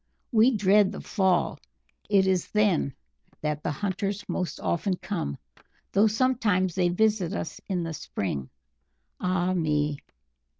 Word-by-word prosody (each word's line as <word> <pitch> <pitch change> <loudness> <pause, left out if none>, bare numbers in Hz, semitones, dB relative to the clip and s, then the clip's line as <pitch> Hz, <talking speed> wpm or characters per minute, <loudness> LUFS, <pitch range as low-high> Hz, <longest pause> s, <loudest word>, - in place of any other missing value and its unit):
We 230 +1 +6
dread 200 0 +4
the - - -6
fall 190 -4 +1 0.5
it 195 -2 +4
is 185 -2 +1
then 195 -10 +2 0.5
that 150 -1 -2
the - - -2
hunters 200 +5 -2
most 180 -5 -3
often 185 +2 0
come, 170 - -4 0.5
though 205 +3 +5
sometimes 215 -6 +1
they 180 -1 +2
visit 210 -1 +1
us 160 - -5
in 180 -3 0
the 165 -1 -4
spring. 80 - -4 0.7
Ah 180 0 +1
me!" 150 -4 0
185 Hz, 130 wpm, -27 LUFS, 165-205 Hz, 0.7 s, We